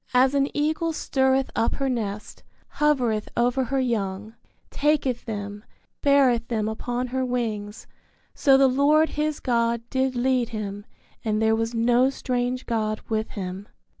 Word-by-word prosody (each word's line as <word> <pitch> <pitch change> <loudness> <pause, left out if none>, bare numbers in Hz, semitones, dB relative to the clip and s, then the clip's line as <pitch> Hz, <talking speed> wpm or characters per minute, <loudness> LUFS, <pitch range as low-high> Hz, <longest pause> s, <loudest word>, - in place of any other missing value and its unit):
As 260 +2 +5
an 280 -1 +2
eagle 315 +2 0
stirreth 265 -2 +1
up 230 - +1
her 275 - -1
nest, 210 -5 -4 0.4
hovereth 250 -8 +1
over 245 +2 +2
her 270 +2 -1
young, 215 -4 -2 0.4
taketh 280 -4 0
them, 205 -1 -5 0.4
beareth 265 -5 +3
them 215 -3 -1
upon 245 +3 -3
her 260 +1 -1
wings, 220 -4 -3 0.5
so 270 -2 +4
the 270 0 +5
Lord 290 +4 +3
his 300 0 -2
God 235 -2 0
did 260 0 0
lead 250 -1 +1
him 205 -2 -6 0.4
and 215 -1 0
there 220 0 +3
was 225 +1 -2
no 240 +3 +3
strange 250 -1 -2
God 215 -2 -1
with 220 -1 -1
him. 190 +1 -5
245 Hz, 145 wpm, -24 LUFS, 220-265 Hz, 0.5 s, As